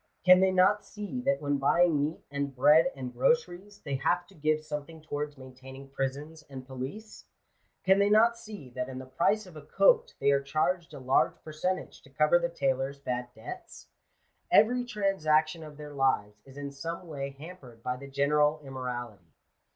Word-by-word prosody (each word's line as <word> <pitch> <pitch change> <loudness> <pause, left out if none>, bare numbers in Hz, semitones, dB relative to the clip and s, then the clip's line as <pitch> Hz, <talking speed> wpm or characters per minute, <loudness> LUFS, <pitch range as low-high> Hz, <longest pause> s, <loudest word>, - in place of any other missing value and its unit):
Can 185 +1 +8
they 190 0 +4
not 185 +3 +3
see 210 +4 -6
that 275 0 +1
when 145 -1 0
buying 170 +4 +3
meat 155 +3 -4
and 140 -1 -3
bread 150 +6 +5
and 130 -2 -6
groceries, 200 - 0
they 140 - -4
have 160 +6 0
to 195 - -20
give 155 -1 0
some 150 -1 -4
thing 160 +2 -13
towards 150 -1 -5
maintaining 130 +1 -12
prisons 140 +4 -4
and 130 -2 -8
police? 135 - -8 0.6
Can 190 +1 +4
they 200 0 +4
not 225 +3 +5
see 210 - -10
that 125 +1 -4
in 130 - -7
the 130 - -7
price 195 +11 +1
of 180 -3 -14
a 155 - -8
coat 485 - +3
they 140 - +3
are 140 0 +3
charged 155 +3 -1
a - - -8
large 130 -1 +1
per 155 - -9
centage 180 +4 -3
to - - -19
cover 150 +5 +3
the 170 0 -1
tailor's 135 -3 -1
bad 125 -2 -3
debts? 110 - -10 0.6
Every 245 +3 +4
transaction 165 -8 +1
of 150 -2 -11
their 150 -1 -9
lives 105 -7 0
is 135 +1 -14
in 140 0 -5
some 165 +6 -6
way 140 -4 -5
hampered 135 -8 -12
by 125 - -1
the 140 +1 -10
general 150 +2 +2
immorality. 120 - -7
150 Hz, 185 wpm, -29 LUFS, 135-180 Hz, 0.6 s, Can